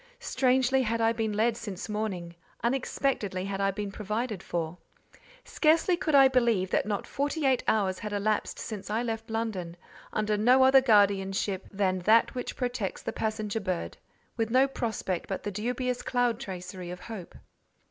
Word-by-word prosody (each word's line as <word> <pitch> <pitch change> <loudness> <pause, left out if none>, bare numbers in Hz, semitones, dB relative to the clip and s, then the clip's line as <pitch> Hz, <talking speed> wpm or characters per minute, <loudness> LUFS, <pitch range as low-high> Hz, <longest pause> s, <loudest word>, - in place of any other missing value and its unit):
Strangely 260 0 +2
had 230 -1 -1
I 225 0 +3
been 225 -2 -1
led 225 +2 +2
since 205 -5 -6
morning—unexpectedly 210 +2 -2
had 195 0 -3
I 195 - +3
been 200 +1 -4
provided 215 0 -3
for. 170 -1 -4 0.6
Scarcely 325 +3 +3
could 315 -3 0
I 270 -1 +8
believe 235 -8 +2
that - - +1
not 205 -2 -2
forty 290 +2 -2
eight 265 -2 +3
hours 190 -4 +1
had 210 -2 -5
elapsed 205 +1 -1
since 210 -3 -6
I 220 +3 0
left 225 -1 -4
London, 210 -7 -3 0.3
under 215 0 0
no 250 +5 +5
other 265 0 +7
guardianship 200 -4 +2
than 190 -2 0
that 220 +5 +4
which 250 - -4
protects 245 -6 -3
the - - -3
passenger 215 -1 -2
bird—with 195 +3 -5
no 260 +3 +4
prospect 220 -8 -3
but 195 - -3
the 205 - -3
dubious 245 +4 -2
cloud 245 -2 0
tracery 180 -5 -7
of 180 0 -7
hope. 200 -4 -8
215 Hz, 160 wpm, -28 LUFS, 195-245 Hz, 0.6 s, I